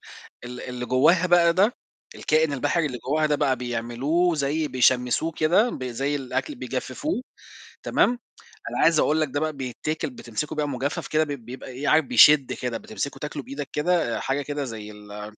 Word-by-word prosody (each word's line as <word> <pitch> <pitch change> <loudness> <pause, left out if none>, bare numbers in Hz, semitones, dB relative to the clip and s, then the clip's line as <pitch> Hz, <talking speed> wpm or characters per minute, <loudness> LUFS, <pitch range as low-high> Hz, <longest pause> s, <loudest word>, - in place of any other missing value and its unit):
ك - - -16
اللي 125 +1 -7
اللي 125 0 -5
جواها 165 +9 +4
بقى 175 -1 +5
ده، 205 +8 +3 0.4
الكائن 155 -1 +1
البحري 145 +4 0
اللي 125 -3 -5
جواها 155 +5 0
ده 150 -1 +1
بقى 135 -3 +1
بيعملوه 125 +9 0
زي 150 +1 -1
بيشمسوه 130 +4 +2
كده 175 +10 +3
ب 130 - -6
زي 135 +4 -2
الأكل 140 - -3
بيجففوه 285 +1 -3 0.6
تمام، - - +3 0.6
أنا - - -4
عايز 165 -2 +4
أقول 155 +1 +2
لك 155 - +1
ده 145 +2 -2
بقى 155 0 -1
بيتاكل 140 +4 -4
بتمسكه 125 +3 -5
بقى 150 -1 -1
مجفف 140 +2 -3
كده 155 0 +2
ب 155 - -5
بيبقى 130 -2 -7
إيه، 130 +3 -5
عارف 155 -2 +4
بيشد 135 +3 +6
كده، 125 -2 -3
بتمسكه 220 -10 -5
تاكله 150 -1 -5
بإيدك 140 +1 -6
كده 160 -5 +1
حاجة 135 +2 -1
كده 145 0 -4
زي 110 -4 -7
ال 105 0 -10
145 Hz, 180 wpm, -24 LUFS, 125-155 Hz, 0.6 s, بيشد